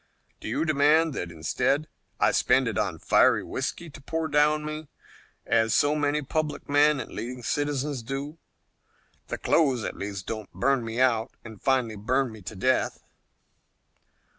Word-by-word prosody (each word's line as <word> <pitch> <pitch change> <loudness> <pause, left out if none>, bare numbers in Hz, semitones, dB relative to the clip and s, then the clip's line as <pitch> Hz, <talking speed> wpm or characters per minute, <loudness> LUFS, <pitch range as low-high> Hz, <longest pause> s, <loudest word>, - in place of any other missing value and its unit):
Do - - -8
you - - -1
demand 155 +1 +3
that 90 -9 -4
instead 85 - 0 0.3
I - - +4
spend 130 -2 +3
it 115 - -2
on 95 -3 -1
fiery - - +3
whisky 170 - -4
to 140 - -12
pour 160 +3 -2
down 150 +1 +2
me, 155 0 -5 0.6
as 115 -1 +2
so 145 +1 +3
many 150 0 0
public 155 +2 -3
men 145 0 +4
and - - -6
leading 125 +1 -6
citizens 145 0 -1
do? 140 +6 -5 0.9
The - - -4
clothes 135 -8 +2
at - - -4
least 100 -1 -5
don't 110 -3 -6
burn 125 +8 +1
me 115 +1 -4
out 120 -2 +2
and 110 -3 -11
finally 125 -5 +1
burn 130 +4 0
me 110 -1 -11
to 95 +4 -8
death." 130 +7 0
135 Hz, 160 wpm, -26 LUFS, 110-150 Hz, 0.9 s, I